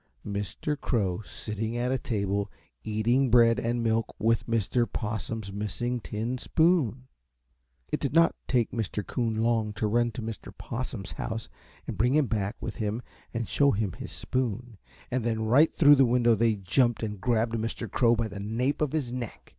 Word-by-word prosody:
Mr. 105 +8 -3
Crow 105 -9 -1
sitting 110 +2 -4
at 125 +1 0
a 130 - +2
table 100 -3 -1 0.3
eating 115 +5 +2
bread 115 -1 +5
and 120 0 -1
milk 115 0 0
with 115 +1 +1
Mr. 115 0 +1
Possum's 110 -2 -4
missing 120 +4 -2
tin 115 +3 -3
spoon. 145 - +2 0.8
It - - -1
did 140 - -1
not 165 +3 +5
take 120 -4 +1
Mr. 105 -3 -3
Coon 115 -3 -1
long 110 -1 +1
to 105 +2 -2
run 120 +3 +2
to 115 - -5
Mr. 110 -2 -6
Possum's 120 -5 -5
house 115 -1 -4 0.4
and 100 - -6
bring 125 +5 +3
him 150 -2 +4
back 105 -3 -1
with - - -5
him 110 +1 -2 0.3
and 115 -1 -3
show 140 -1 +3
him 105 -5 0
his - - -8
spoon, 120 -3 -3 0.3
and 125 -1 0
then 110 -1 -1
right 140 +8 +5
through 145 -2 +6
the 135 - +6
window 120 -1 +4
they 110 0 +2
jumped 115 +6 +1
and 105 -3 -4
grabbed 115 -1 +1
Mr. 115 0 -3
Crow 115 +3 +3
by 115 -1 -1
the 100 -2 -8
nape 115 +9 -1
of 150 -2 0
his 140 -6 -1
neck. 120 -3 -6
115 Hz, 180 wpm, -28 LUFS, 110-125 Hz, 0.8 s, through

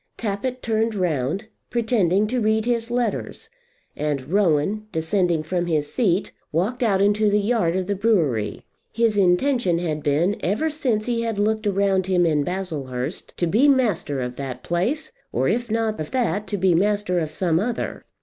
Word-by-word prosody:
Tappitt 235 +4 -3
turned 225 -1 0
round, 170 +1 -1 0.2
pretending 215 -5 +2
to 245 +3 -1
read 220 0 +2
his 235 -1 0
letters, 240 -2 -2 0.4
and 145 -1 -3
Rowan 200 +2 +1
descending 165 0 0
from 175 +2 -2
his 150 -3 -1
seat 200 -7 +1 0.2
walked 195 +11 -1
out 200 -5 +3
into 205 +1 +3
the 205 - +3
yard 205 -5 +1
of 185 -1 0
the 200 - -1
brewery. 165 - 0 0.3
His 230 -2 +1
intention 195 +1 +2
had 160 -3 -2
been, 155 +8 +1
ever 295 - 0
since 245 -8 -1
he 235 -1 0
had 225 -2 -2
looked 215 +1 0
around 195 -1 +1
him 180 -2 +3
in 150 -3 +2
Baslehurst, 150 -6 -4
to 175 - +1
be 220 - +3
master 215 - +1
of 125 0 -4
that 130 -2 -6
place, 240 - -1 0.2
or - - 0
if 240 -1 0
not 220 -2 -1
of 155 - -4
that, 210 -5 -1
to 205 - -2
be 185 -1 +3
master 200 0 +1
of 160 -2 -2
some 165 +1 0
other. 230 +4 -3
195 Hz, 170 wpm, -23 LUFS, 165-225 Hz, 0.4 s, out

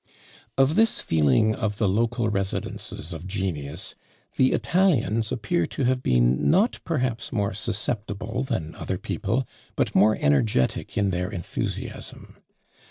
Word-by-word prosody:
Of 135 +2 +4
this 225 +4 +3
feeling 80 - +3
of 105 -2 -2
the 105 - +2
local 115 +4 +1
residences 95 -4 -3
of 85 +2 -7
genius, 85 -5 -4 0.4
the 130 - +4
Italians 120 - +2
appear 150 +8 0
to - - -3
have 130 0 +2
been 60 - +3
not 205 +8 +3
perhaps 125 -7 -1
more 100 -2 0
susceptible 105 +3 -2
than 80 - -3
other - - -4
people, 125 +1 -2 0.3
but - - 0
more 105 +3 +5
energetic 70 - +1
in 100 -1 +2
their 90 0 -1
enthusiasm. 85 -3 -5
105 Hz, 130 wpm, -25 LUFS, 90-125 Hz, 0.4 s, more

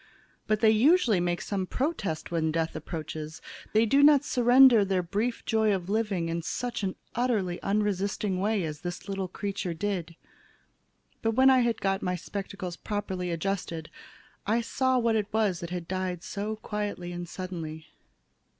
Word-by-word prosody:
But 215 -1 +1
they 220 -1 +6
usually 240 - +4
make 175 0 0
some 195 -2 -2
protest 255 - -2
when 160 -2 +1
Death 165 0 -1
approaches. 155 -1 -6 0.3
They 220 +2 +4
do 275 +6 +4
not 290 -1 +7
surrender 245 -3 +6
their 190 -2 0
brief 210 +7 -2
joy 220 -2 +2
of 180 -1 -5
living 205 -5 0
in 165 +1 -2
such 235 +6 -3 0.3
utterly 215 -8 0
unresisting 200 -1 0
way 205 0 +1
as 150 -2 -5
this 175 0 -6
little 195 -1 -2
creature 190 -2 -4
did. 175 -2 -3 1.1
But 225 0 +1
when 265 +1 +6
I 260 - +5
had 235 -2 +1
got 195 0 0
my 180 0 -1
spectacles 185 -1 -6
properly 190 -4 -3
adjusted, 170 -2 -3 0.6
I 225 +3 +2
saw 260 +2 +1
what 230 -2 +2
it 210 -2 -1
was 210 -5 +1
that 170 - -6
had 175 -2 -5
died 185 -2 -3
so 210 +2 -3
quietly 205 -4 -4
and 175 -1 -6
suddenly. 165 -4 -6
195 Hz, 160 wpm, -28 LUFS, 175-220 Hz, 1.1 s, not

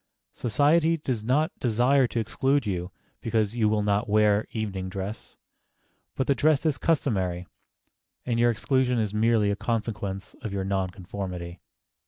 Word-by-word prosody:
Society 155 +7 +2
does 130 -8 -3
not 150 +9 +2
desire 125 +3 +3
to 115 - -2
exclude 135 +4 0
you 90 -3 -2 0.3
because 110 -1 0
you 110 -3 +2
will 105 -1 +1
not 105 +2 0
wear 105 0 +3
evening 100 -4 -3
dress; 95 +3 -6 0.8
but 130 - 0
the 140 - +3
dress 145 +4 +2
is 145 -4 +1
customary, 95 - 0 0.8
and 115 -2 0
your 120 0 +4
exclusion 125 +2 +1
is 105 -3 -1
merely 110 -1 +3
a - - 0
consequence 105 -3 -3
of 110 - -5
your 100 -1 -2
non 95 -1 -1
conformity. 90 -2 -6
110 Hz, 150 wpm, -26 LUFS, 100-125 Hz, 0.8 s, your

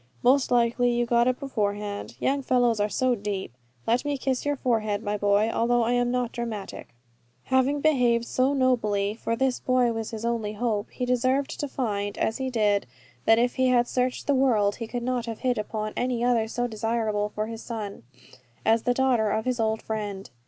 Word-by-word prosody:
Most 260 +2 +4
likely 245 0 +2
you 240 0 +1
got 235 0 +3
it 255 0 +1
beforehand. 205 -5 -3
You - - +1
young 280 +1 0
fellows 245 -4 +2
are 205 +1 +1
so 255 +3 +1
deep. 200 - -4 0.3
Let 235 +2 +2
me 290 -1 -1
kiss 265 +1 -2
your 290 - +1
forehead, 220 -5 0
my 205 -1 -1
boy, 205 +2 +2
although 240 +1 +2
I 230 - 0
am 245 0 +2
not 245 -1 -1
dramatic." 225 -4 -5 0.6
Having 260 +2 +1
behaved 245 -6 +3
so 260 +3 +1
nobly, 215 -6 +1
for 230 +1 -2
this 260 +1 0
boy 250 -2 +2
was 225 -1 -4
his 225 0 -5
only 225 -3 -1
hope, 215 -1 -1
he 250 - -4
deserved 255 +2 0
to 290 - -2
find, 205 -6 -3
as 220 - 0
he 265 0 -1
did, 210 - +1 0.4
that 225 - +6
if 245 +1 +1
he 260 0 +3
had 245 -1 +3
searched 250 0 -1
the 285 - +2
world 225 -7 +2
he 230 - -5
could 240 +1 -4
not 250 -1 -1
have 225 -1 -6
hit 250 -3 +1
upon 215 0 -4
any 245 -1 -1
other 240 -2 +2
so 245 +2 -2
desirable 220 -2 -1
for 215 - -1
his 225 0 -7
son, 215 -4 -6 0.6
as 225 +1 +4
the 245 +1 0
daughter 245 -5 +2
of 220 +1 -1
his 250 -1 -1
old 220 0 0
friend. 205 -3 -5
235 Hz, 200 wpm, -26 LUFS, 215-250 Hz, 0.6 s, that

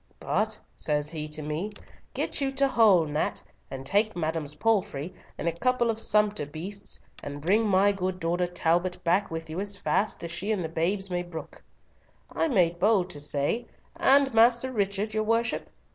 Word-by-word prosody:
'But,' - - 0 0.2
says 150 0 0
he 155 -2 -4
to 155 0 -4
me, 160 +8 -3 0.4
'get - - -1
you 270 -1 +1
to 275 0 +3
Hull, 215 -10 +5
Nat, 150 0 -2 0.3
and 135 0 -7
take 210 +8 +2
madam's 160 -3 -2
palfrey 185 -6 0 0.2
and - - -3
a - - +3
couple 240 +6 +1
of 220 - -6
sumpter 210 -5 +2
beasts, 185 +7 -6 0.2
and 145 0 -6
bring 205 +9 +2
my 200 +1 +4
good 185 -2 -3
daughter 175 +1 0
Talbot 175 +1 0
back 180 +4 +2
with 165 0 -5
you 160 +3 -5
as 200 0 -1
fast 205 -1 0
as 170 - -4
she 195 +5 -2
and 200 -5 0
the 160 - -3
babes 190 +4 -1
may 175 0 0
brook.' 175 -2 -9 0.7
I 325 - +1
made 175 - +2
bold 195 -2 +3
to 145 - -5
say, 145 +11 0 0.3
'And 270 -1 +4
Master 235 +3 +4
Richard, 200 0 -1
your 215 0 +1
worship?' 230 +1 0
185 Hz, 180 wpm, -27 LUFS, 165-215 Hz, 0.7 s, Hull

